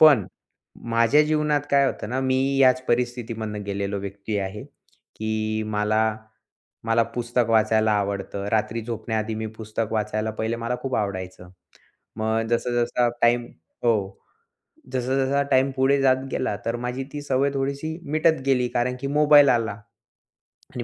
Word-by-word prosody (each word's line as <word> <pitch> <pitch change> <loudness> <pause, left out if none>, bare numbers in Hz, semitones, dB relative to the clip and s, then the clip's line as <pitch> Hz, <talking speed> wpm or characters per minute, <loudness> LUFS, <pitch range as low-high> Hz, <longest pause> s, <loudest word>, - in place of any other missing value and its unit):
पण 145 - +7 0.7
माझ्या 115 +6 +5
जीवनात 150 -1 +1
काय 140 -1 +4
होतं 105 - -3
ना, 130 - -1
मी 130 +1 +1
याच 130 -1 +5
परिस्थितीमधनं 115 -3 -2
गेलेलो 100 0 -2
व्यक्ती 100 +2 -4
आहे, 100 +1 -4
की 110 0 -5
मला 110 +1 +1 0.7
मला 115 0 +3
पुस्तक 120 +1 -1
वाचायला 110 -1 +3
आवडतं, 100 -1 -2
रात्री 110 +1 0
झोपण्याआधी 110 -1 -3
मी 110 0 -3
पुस्तक 110 0 -4
वाचायला 110 0 -1
पहिले. 110 +1 -2
मला 115 +1 -2
खूप 135 -1 -2
आवडायचं. 95 -3 -4 0.7
मग 110 +1 0
जसं-जसं 120 0 +1
टाईम 120 +1 +4 0.4
हो 115 -2 +5 1.0
जसं-जसा 130 +2 +1
टाईम 130 +1 +4
हो, - - -4
पुढे 135 +1 +3
जात 130 -1 +5 0.2
गेला 125 - -1
तर 115 - -1
माझी 125 +2 -3
ती 145 - -4
सवय 140 0 +1
थोडीशी 140 +4 -3
मिटत 155 -1 +2
गेली. 125 -2 +2
कारण 125 +1 0
की 140 - -2
मोबाईल 145 0 +6
आला 115 -3 +2 1.0
आणि - - -4
120 Hz, 140 wpm, -24 LUFS, 110-130 Hz, 1.0 s, पण